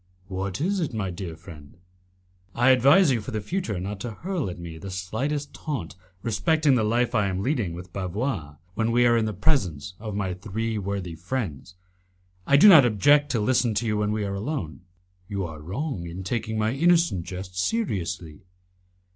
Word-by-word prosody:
"What 95 0 -3
is 190 +6 0
it, 150 -9 -2
my 95 -4 -2
dear 85 -2 -6
friend?" 80 -3 -13 0.8
"I 120 +3 +5
advise 140 +7 +6
you 120 -3 +1
for 105 - -8
the 110 - -2
future 110 - -3
not 100 +2 -5
to 120 - -4
hurl 165 - -3
at 90 - -7
me 85 -2 -8
the 95 - -7
slightest 125 +11 -3
taunt 100 - -5 0.3
respecting 155 +5 +2
the 120 -4 +3
life 120 +3 +1
I 105 -4 +2
am 95 0 -2
leading 120 - 0
with 90 +1 -10
Bavois, 95 - -3 0.2
when 115 +3 0
we 120 +1 +4
are 120 -1 +5
in 115 -1 +2
the 110 - -1
presence 95 - 0
of 105 -2 -5
my 95 -3 -1
three 110 +4 -3
worthy 100 -3 -4
friends. 90 - -4 0.7
I 140 - +6
do 180 - +8
not 165 -8 +10
object 145 +6 +4
to 115 - +1
listen 115 +1 +2
to 115 +3 0
you 105 -1 0
when 105 0 0
we 105 -1 -1
are 100 - -3
alone." 100 - -4 0.5
"You 100 -1 -3
are 80 -2 -8
wrong 95 - -4
in 90 +3 -6
taking 110 +2 -2
my 110 +2 +1
innocent 165 - +3
jests 90 0 -5
seriously." 90 - -2
105 Hz, 190 wpm, -25 LUFS, 90-130 Hz, 0.8 s, not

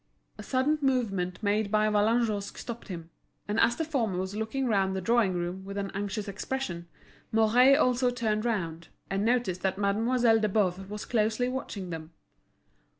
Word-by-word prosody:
A - - -4
sudden 275 +4 +1
movement 210 -9 0
made 205 0 +1
by 215 +1 +3
Vallagnosc 215 0 +1
stopped 235 -1 -7
him; 170 -4 -7 0.4
and 210 +2 0
as 235 - +4
the 320 - -2
former 235 - -1
was 190 +2 -3
looking 220 +5 -2
round 195 -4 +1
the - - -1
drawing 215 -1 +2
room 175 +2 -3
with 200 +1 -7
an 195 -1 -3
anxious 205 +1 -3
expression, 195 -4 -4 0.4
Mouret 235 +5 +5
also 250 -2 +3
turned 220 -3 -1
round, 170 -8 -2 0.2
and 195 +1 0
noticed 230 -6 +1
that 190 0 0
Mademoiselle 225 +3 +3
de 215 -1 +1
Boves 190 -2 0
was 210 0 -6
closely 225 +1 +1
watching 210 -8 -5
them. 160 0 -7
210 Hz, 165 wpm, -28 LUFS, 190-240 Hz, 0.4 s, Mouret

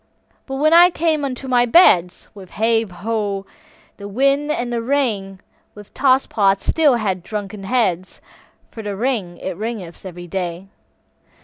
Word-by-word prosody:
But 270 - -5
when 305 +4 +2
I 350 +1 +8
came 320 -3 0
unto 265 -1 -4
my 245 -1 +2
beds, 185 - +4
With 195 -3 -12
hey, 225 +1 +2
ho, 200 +1 -3 0.5
the 200 - -8
wind 275 +7 +1
and 240 -5 -2
the 235 - -1
rain, 225 -8 -1 0.4
With 205 -1 -14
toss 265 -1 +3
pots 195 -2 +1
still 300 -5 +3
had 195 -5 -2
drunken 205 +1 -6
heads, 190 -6 -1 0.5
For 225 - -8
the 205 -2 -5
rain 205 -6 -2
it 190 - -4
raineth 215 -6 -6
every 175 -2 -9
day. 180 +1 -5
220 Hz, 150 wpm, -19 LUFS, 195-260 Hz, 0.5 s, I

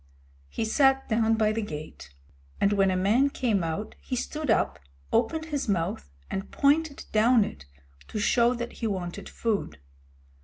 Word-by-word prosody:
He 225 - -2
sat 270 +3 +3
down 225 0 +3
by 215 -1 +2
the 225 +1 -1
gate, 150 - -8 0.5
and 200 - +3
when 195 -1 +3
a 185 - +1
man 220 +9 +3
came 225 -9 0
out 165 +6 -3
he 255 - -4
stood 300 +3 -3
up, 220 - +2 0.3
opened 320 -1 +1
his 290 -6 -3
mouth, 165 - -1 0.2
and 195 +1 -4
pointed 290 +1 +1
down 225 +1 +5
it 75 - -8 0.4
to - - -6
show 235 +3 +3
that 240 0 -5
he 230 - -3
wanted 180 -4 -4
food. 205 - -2
220 Hz, 160 wpm, -27 LUFS, 195-255 Hz, 0.5 s, down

